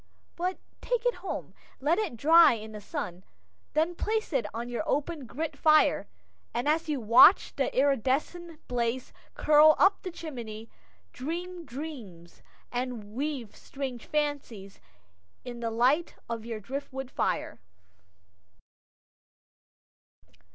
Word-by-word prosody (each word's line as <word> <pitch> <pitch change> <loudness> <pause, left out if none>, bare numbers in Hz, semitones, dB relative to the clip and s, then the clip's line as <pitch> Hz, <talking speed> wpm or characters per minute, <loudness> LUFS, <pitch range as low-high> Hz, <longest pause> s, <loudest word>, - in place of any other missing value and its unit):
But 365 +2 -2 0.2
take - - -1
it - - +1
home, - - -5 0.3
let 310 +8 +2
it 380 - -3
dry 330 +5 +7
in 220 -1 -7
the 210 -1 -8
sun, 190 - -5 0.5
then 320 +3 +2
place 435 +1 -2
it 245 -6 +1
on 235 +2 -5
your 245 -1 -3
open 295 -2 -2
grate 310 +6 -4
fire, 310 -1 +4 0.5
and 240 +4 -1
as 320 +2 +1
you 295 -3 0
watch 235 - +6
the 275 - 0
iridescent 285 +5 0
blaze 245 +1 -2 0.2
curl 305 0 +6
up 390 +1 +4
the 370 - -5
chimney, 235 -10 -8 0.4
dream 345 +5 -5
dreams, 235 - -9 0.3
and 245 -4 -4
weave 270 -3 -4
strange 265 -4 -6
fancies 285 -10 -3 0.7
in 240 -1 -7
the 230 -1 -2
light 255 +9 +2
of 230 -1 -5
your 225 -2 -4
driftwood 265 +3 -6
fire. - - -2
275 Hz, 125 wpm, -28 LUFS, 235-320 Hz, 0.7 s, dry